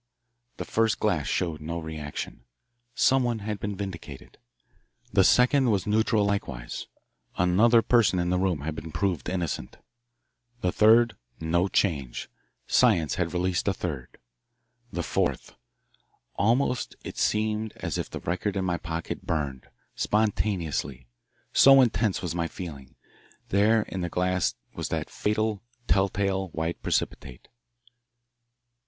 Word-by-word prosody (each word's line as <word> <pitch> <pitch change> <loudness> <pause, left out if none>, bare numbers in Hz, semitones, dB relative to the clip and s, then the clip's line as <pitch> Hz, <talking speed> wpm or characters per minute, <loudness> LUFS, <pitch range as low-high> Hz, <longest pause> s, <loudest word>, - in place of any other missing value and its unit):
The - - -4
first 115 -1 +1
glass 85 -9 0
showed 80 -4 -1
no 85 +2 -4
reaction. 80 -6 -6 0.5
Someone 125 -3 +3
had 105 -2 -3
been 100 +1 -3
vindicated. 90 -8 -8 0.7
The 95 -1 +5
second 125 +4 +4
was 100 -2 +1
neutral 110 0 +2
likewise 70 -12 -3 0.5
another 110 +7 +4
person 115 -6 +3
in 90 0 0
the 90 - +2
room 90 -6 0
had 80 +2 -3
been 80 +1 -7
proved 90 0 -1
innocent. 85 -8 -3 0.8
The 90 - +1
third 115 +3 +5 0.2
no 85 +3 +1
change. 70 -11 -1 0.3
Science 80 -3 +3
had 85 - -1
released 90 +1 -1
a 100 - +2
third. 70 -10 -5 0.7
The - - -3
fourth - - -1 0.8
Almost 125 +4 +1
it - - -7
seemed 110 0 0
as - - -3
if - - -4
the - - -6
record 95 +4 -2
in 95 - -1
my 90 -1 0
pocket 85 -1 -5
burned 70 -5 -2 0.3
spontaneously 95 - -1 0.5
so 135 0 +8
intense 115 -6 +2
was 85 -3 -2
my 85 -1 -1
feeling. 75 -8 -9 0.5
There 105 +3 +4
in 95 - -5
the 85 - -2
glass 90 -4 0 0.2
was - - -4
that - - -3
fatal, 105 -1 -1 0.3
telltale 95 0 +1
white 80 +1 -3
precipitate. 60 -2 -3
95 Hz, 130 wpm, -27 LUFS, 80-105 Hz, 0.8 s, so